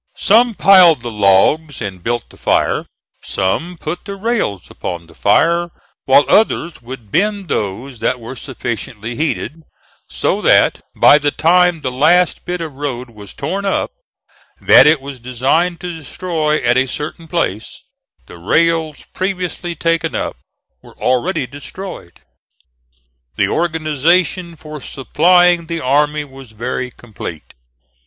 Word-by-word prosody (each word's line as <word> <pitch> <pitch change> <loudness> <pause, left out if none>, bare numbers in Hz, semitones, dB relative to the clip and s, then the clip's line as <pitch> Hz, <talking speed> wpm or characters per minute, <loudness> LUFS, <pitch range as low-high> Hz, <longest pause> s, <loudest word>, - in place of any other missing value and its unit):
Some 230 +2 +3
piled 180 -10 +6
the 120 - -4
logs 105 +9 +2
and 95 -5 -6
built 120 +1 -3
the - - -16
fire; - - 0 0.3
some 160 - -2
put 155 +3 -5
the 200 -1 -6
rails 200 - -2
upon 85 -1 -6
the 85 - -18
fire; 170 +11 +2 0.4
while 135 +2 +5
others 175 -6 +1
would 120 -4 -10
bend 200 - 0
those 115 +5 -3
that 125 +3 -1
were 115 +3 -8
sufficiently 120 -3 -5
heated: 155 +1 -3 0.5
so - - -1
that, - - +4
by 145 - +6
the 145 -1 +1
time 175 +2 +3
the 130 - -2
last 165 +7 +2
bit 180 -1 -3
of 160 -3 -5
road 130 -3 -5
was 105 -3 -12
torn 185 +8 -3
up, 195 - -1 0.7
that - - +7
it 150 -2 +4
was 135 -1 -8
designed 135 +9 0
to 180 -1 -5
destroy 160 -1 -2
at 120 +2 +3
a 130 - +1
certain 155 +5 -6
place, 115 - -3 0.4
the 85 - -13
rails 160 - 0
previously 180 -2 -3
taken 165 0 -1
up - - -3 0.5
were - - -17
already 125 +1 0
destroyed. 145 - -9 1.1
The - - +1
organization 165 +2 0
for 155 -1 -10
supplying 175 +5 +2
the 165 0 -3
army 150 +3 +1
was 135 -4 -14
very 125 +3 -3
complete. 105 -10 -9
150 Hz, 135 wpm, -17 LUFS, 120-175 Hz, 1.1 s, that